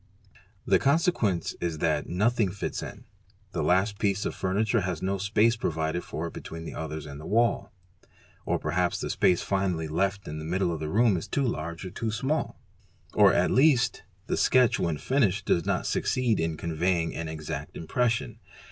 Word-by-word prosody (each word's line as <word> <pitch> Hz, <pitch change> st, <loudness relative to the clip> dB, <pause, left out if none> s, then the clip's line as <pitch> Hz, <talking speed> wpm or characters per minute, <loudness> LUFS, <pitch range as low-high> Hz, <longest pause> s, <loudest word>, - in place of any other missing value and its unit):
The -, -, +4 dB
con 140 Hz, +3 st, +4 dB
sequence 120 Hz, -, 0 dB
is 85 Hz, -2 st, -2 dB
that 75 Hz, -2 st, 0 dB
nothing 110 Hz, +3 st, +2 dB
fits 95 Hz, +2 st, -4 dB
in; -, -, -8 dB, 0.5 s
the -, -, -2 dB
last 100 Hz, +3 st, +2 dB
piece 100 Hz, -2 st, 0 dB
of -, -, -1 dB
furniture 105 Hz, +4 st, 0 dB
has 90 Hz, -3 st, -2 dB
no 95 Hz, +1 st, -1 dB
space 105 Hz, +4 st, +3 dB
provided 80 Hz, -4 st, -2 dB
for 80 Hz, -, -5 dB
it 85 Hz, -, -6 dB
between 80 Hz, 0 st, -8 dB
the -, -, -6 dB
others 80 Hz, -1 st, -5 dB
and 70 Hz, 0 st, -8 dB
the -, -, -8 dB
wall; 115 Hz, +3 st, +1 dB, 0.7 s
or -, -, 0 dB
perhaps 85 Hz, +3 st, 0 dB
the -, -, -2 dB
space 90 Hz, -, +2 dB
finally 95 Hz, -5 st, -1 dB
left 95 Hz, +5 st, -1 dB
in 75 Hz, +1 st, -5 dB
the -, -, -6 dB
middle 90 Hz, +2 st, 0 dB
of 80 Hz, -, -4 dB
the 75 Hz, 0 st, -3 dB
room 110 Hz, +1 st, +3 dB
is 80 Hz, -, -5 dB
too 140 Hz, -, 0 dB
large 85 Hz, -4 st, -4 dB
or 90 Hz, -, -6 dB
too 115 Hz, +3 st, -3 dB
small; 135 Hz, +8 st, -2 dB, 0.5 s
or -, -, +6 dB
at -, -, +2 dB
les 145 Hz, +4 st, +6 dB
st 125 Hz, 0 st, -1 dB, 0.2 s
the -, -, -1 dB
sketch 125 Hz, -3 st, +4 dB
when 80 Hz, -3 st, 0 dB
finished 100 Hz, -, +1 dB
''does 85 Hz, -, +1 dB
not -, -, 0 dB
succeed 125 Hz, -4 st, +1 dB
in 80 Hz, -1 st, -1 dB
conveying 85 Hz, +1 st, 0 dB
an 80 Hz, -, -4 dB
exact 75 Hz, -2 st, -6 dB
impres 120 Hz, +9 st, 0 dB
sion". 115 Hz, -, -3 dB
95 Hz, 190 wpm, -27 LUFS, 80-110 Hz, 0.7 s, or